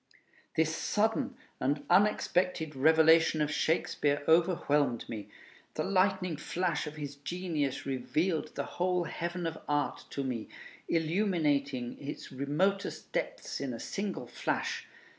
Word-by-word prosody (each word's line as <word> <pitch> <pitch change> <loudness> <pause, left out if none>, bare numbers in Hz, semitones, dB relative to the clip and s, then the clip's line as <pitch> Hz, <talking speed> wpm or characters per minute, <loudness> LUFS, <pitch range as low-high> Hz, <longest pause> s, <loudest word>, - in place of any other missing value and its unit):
This 160 0 +2
sudden 225 +8 0 0.2
and 145 +2 0
unexpected 180 -4 +2
revelation 160 +3 +5
of 150 -1 +1
Shakespeare 145 -3 +1
overwhelmed 150 -7 +3
me. 110 -3 -6 0.5
The - - 0
lightning 185 -3 +2
flash 170 +1 -1
of 150 - -6
his 145 -2 -6
genius 155 -3 -2
revealed 155 +5 -1
the - - -2
whole 180 0 0
heaven 175 +1 -3
of 160 -1 -3
art 145 0 0
to 140 - -3
me, 125 -4 -3 0.4
illuminating 155 - +1
its 145 +1 -6
remotest 150 +9 -1
depths - - -3
in 130 -4 -3
a - - -8
single 200 - -3
flash. - - -2
160 Hz, 120 wpm, -31 LUFS, 145-180 Hz, 0.5 s, revelation